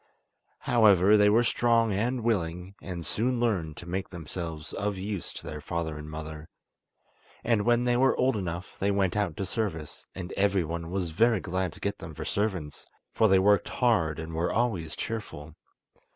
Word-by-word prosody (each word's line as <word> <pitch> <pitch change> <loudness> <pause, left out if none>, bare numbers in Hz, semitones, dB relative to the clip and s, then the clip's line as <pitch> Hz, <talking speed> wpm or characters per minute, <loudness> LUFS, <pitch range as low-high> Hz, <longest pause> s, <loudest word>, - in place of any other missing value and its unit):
However, 105 -4 +5
they 105 0 +6
were 115 +3 +4
strong 115 -2 +2
and 120 +5 -1
willing, 90 -4 -1
and 85 -3 -6
soon 120 +3 0
learned 90 -10 0
to - - -8
make 95 +2 -3
themselves 80 -2 -6
of 100 -1 -2
use 100 0 -4
to - - -9
their 75 0 -6
father 80 0 -3
and 75 0 -8
mother, 80 0 -7 0.9
and 115 -3 +2
when 120 0 +3
they 120 0 +2
were 130 +2 +3
old 130 0 +2
enough 90 -2 -4
they 100 - +1
went 100 -2 +1
out 100 -7 -1
to 100 - -2
service, 90 -9 -4
and 95 -1 -6
everyone 85 -4 0
was 90 -2 -2
very 110 +5 +3
glad 95 -1 -2
to - - -13
get 100 0 -3
them 80 -2 -8
for - - -6
servants, 95 -8 -2 0.3
for 110 - +4
they 95 -2 +5
worked 100 0 +3
hard 100 - +2
and 80 0 -6
were 85 +2 0
always 100 -10 -1
cheerful. 80 -9 -5
95 Hz, 180 wpm, -28 LUFS, 85-110 Hz, 0.9 s, they